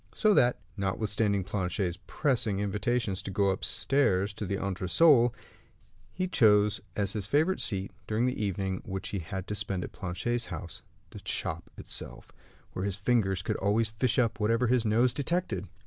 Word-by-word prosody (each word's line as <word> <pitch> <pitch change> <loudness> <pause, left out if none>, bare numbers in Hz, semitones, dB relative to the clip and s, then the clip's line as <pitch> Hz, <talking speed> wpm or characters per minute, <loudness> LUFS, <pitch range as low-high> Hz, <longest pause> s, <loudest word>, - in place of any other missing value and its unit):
So 215 -1 +4
that, 125 -9 +4 0.2
notwithstanding 100 +1 0
Planchet's 90 -2 -2
pressing 120 -9 0
invitations 105 0 -1
to - - -6
go 100 0 +2
upstairs 100 -1 +1
to 105 -1 -5
the 100 - -1
entresol, 115 - +4 0.8
he 185 0 -2
chose 105 - +4
as 100 -2 0
his 105 -3 -3
favorite 155 - +2
seat, 100 -3 +1 0.2
during 110 +3 +1
the 125 -4 -1
evening 95 -1 -2
which 95 0 -5
he 100 - -3
had 95 +2 -5
to 105 - -4
spend 95 -2 -2
at - - -7
Planchet's 115 +7 -3
house, 85 -5 -7 0.3
the - - -10
shop 85 +1 -3
itself, - - -7 0.4
where 95 - -3
his 100 -2 -1
fingers 100 -3 +1
could - - -1
always 105 +3 +2
fish 115 +4 0
up 115 -3 +1
whatever 115 +3 +2
his 120 -1 +2
nose 120 +3 +3
detected. 140 - -1
105 Hz, 165 wpm, -29 LUFS, 95-120 Hz, 0.8 s, So